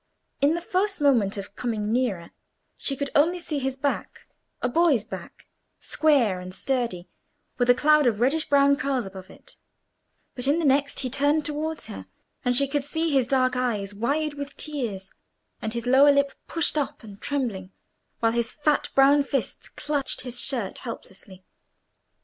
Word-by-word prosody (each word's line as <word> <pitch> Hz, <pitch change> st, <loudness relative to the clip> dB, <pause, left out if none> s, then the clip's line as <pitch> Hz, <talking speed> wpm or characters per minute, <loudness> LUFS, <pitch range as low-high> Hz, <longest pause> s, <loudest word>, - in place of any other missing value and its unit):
In 290 Hz, +4 st, +4 dB
the 340 Hz, -, -3 dB
first 385 Hz, +3 st, -1 dB
moment 235 Hz, -9 st, +3 dB
of 200 Hz, 0 st, -7 dB
coming 220 Hz, -3 st, -2 dB
nearer 215 Hz, -9 st, -1 dB, 0.4 s
she 275 Hz, -, -3 dB
could 280 Hz, 0 st, -3 dB
only 330 Hz, +5 st, +3 dB
see 315 Hz, -4 st, -3 dB
his 265 Hz, -1 st, -2 dB
back—a 275 Hz, -2 st, -4 dB
boy's 290 Hz, -, +3 dB
back, -, -, -10 dB, 0.3 s
square 260 Hz, -12 st, +2 dB
and 180 Hz, 0 st, -7 dB
sturdy, 235 Hz, -10 st, -2 dB, 0.5 s
with 245 Hz, 0 st, +2 dB
a 245 Hz, -, +7 dB
cloud 300 Hz, 0 st, +4 dB
of 215 Hz, -3 st, +1 dB
reddish 280 Hz, +6 st, +1 dB
brown 280 Hz, 0 st, +5 dB
curls 275 Hz, -5 st, -1 dB
above 190 Hz, -1 st, -10 dB
it; -, -, -11 dB, 0.8 s
but 250 Hz, +1 st, -2 dB
in 290 Hz, +3 st, +3 dB
the 335 Hz, -, 0 dB
next 280 Hz, +1 st, +2 dB
he 255 Hz, -, -2 dB
turned 290 Hz, +3 st, +2 dB
towards 305 Hz, +2 st, -3 dB
her, 95 Hz, -1 st, -8 dB, 0.4 s
and 245 Hz, 0 st, +2 dB
she 280 Hz, +2 st, +3 dB
could 290 Hz, +1 st, 0 dB
see 320 Hz, +3 st, -1 dB
his 265 Hz, -4 st, +2 dB
dark 255 Hz, -1 st, +2 dB
eyes 215 Hz, -6 st, -1 dB
wide 285 Hz, +8 st, -1 dB
with 285 Hz, -1 st, -7 dB
tears, 230 Hz, -11 st, -4 dB, 0.5 s
and 220 Hz, -, -3 dB
his 235 Hz, 0 st, -3 dB
lower 270 Hz, +3 st, +6 dB
lip 280 Hz, 0 st, +2 dB, 0.2 s
pushed 330 Hz, -2 st, +1 dB
up 280 Hz, -, -4 dB
and 205 Hz, -2 st, -12 dB
trembling, 230 Hz, -10 st, -2 dB, 0.5 s
while 225 Hz, -1 st, +3 dB
his 235 Hz, 0 st, -1 dB
fat 300 Hz, 0 st, +1 dB
brown 275 Hz, +2 st, +6 dB
fists 275 Hz, -1 st, -3 dB
clutched 290 Hz, -2 st, -2 dB
his 250 Hz, -1 st, -4 dB
shirt 240 Hz, -8 st, -2 dB
helplessly. 190 Hz, -5 st, -10 dB
270 Hz, 165 wpm, -25 LUFS, 230-290 Hz, 0.8 s, a